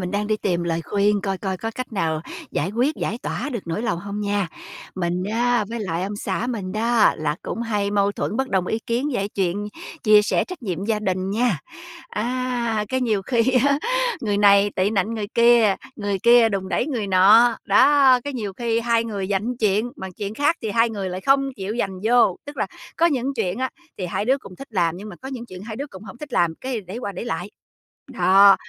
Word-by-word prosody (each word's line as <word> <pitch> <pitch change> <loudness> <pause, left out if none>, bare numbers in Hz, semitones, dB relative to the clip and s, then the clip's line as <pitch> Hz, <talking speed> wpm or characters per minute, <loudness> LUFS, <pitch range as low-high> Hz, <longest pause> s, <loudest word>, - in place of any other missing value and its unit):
mình 180 0 -3
đang 205 +1 -1
đi 215 0 +1
tìm 175 -4 -1
lời 170 -1 -1
khuyên 205 0 +1
coi 195 -1 -2
coi 190 -1 -3
có 225 +4 -4
cách 255 -1 -6
nào 160 -6 -1 0.3
giải 170 +6 -1
quyết, 250 +8 +1
giải 225 - -3
tỏa 280 - -3
được 235 - -2
nỗi 170 +6 -2
lòng 200 -7 -1
hông 200 +3 -5
nha. 205 -3 0 0.5
Mình 180 0 -1
á, 240 -1 +2
với 235 0 -4
lại 175 -4 -2
ông 200 +2 -3
xã 230 - -2
mình 205 -7 -4
đó 225 +1 +3
là 150 -1 -2
cũng 235 - -4
hay 210 -3 -1
mâu 200 0 +2
thuẫn 210 - -3
bất 265 +1 -1
đồng 190 -5 0
ý 220 - -1
kiến 240 +5 0
về 200 -2 -1
chuyện 200 +1 -2 0.3
chia 210 -1 +6
sẻ 210 - +1
trách 365 -7 -9
nhiệm 190 -3 -3
gia 220 0 0
đình 190 -2 -2
nha. 225 0 +1 0.5
Á, 240 -1 -1
cái 260 +3 -1
nhiều 220 -6 0
khi 235 +3 +1 0.3
á, 280 0 +2 0.4
người 210 -5 0
này 200 0 +5
tị 190 +2 +2
nạnh 215 +1 0
người 215 -2 -3
kia, 235 -3 +5 0.2
người 205 -2 -2
kia 235 +2 +6
đùn 195 -3 -3
đẩy - - 0
người 240 -9 -2
nọ. 210 +5 +6
Đó, 265 +4 +5
cái 285 - -3
nhiều 215 -6 -4
khi 230 +3 -1
hai 230 -1 +1
người 200 -4 -3
giành 195 -1 +2
một 245 +1 -3
chuyện, 215 +2 +1
mà 190 - -6
chuyện 205 +1 -4
khác 290 +6 +2
thì 220 - -2
hai 230 +2 +3
người 200 -4 -3
lại 185 +1 -5
không 275 +5 +3
chịu 200 +3 -4
giành 190 -4 -2
vô. 235 -5 +4
Tức 290 0 -9
là - - 0 0.3
có 335 - +4
những 275 -3 0
chuyện 205 -4 -2
á, 260 0 -1 0.3
thì 185 - -2
hai 180 - -2
đứa 265 +4 +2
cũng 185 -8 -13
thích 275 - -10
làm, 175 -4 +1
nhưng 205 +3 -8
mà 190 - -9
có 265 - -6
những 250 -3 -6
chuyện 185 -3 -10
hai 215 +1 -7
đứa 280 +4 -4
cũng 190 -8 -12
không 190 - -10
thích 295 -2 -9
làm, 170 -6 +2
cái 255 -3 -3
đẩy 195 +3 -8
qua 205 -5 -4
đẩy 190 - -6
lại. 180 -3 -4 0.6
Đó, 200 -6 +6
210 Hz, 235 wpm, -22 LUFS, 195-240 Hz, 0.6 s, chia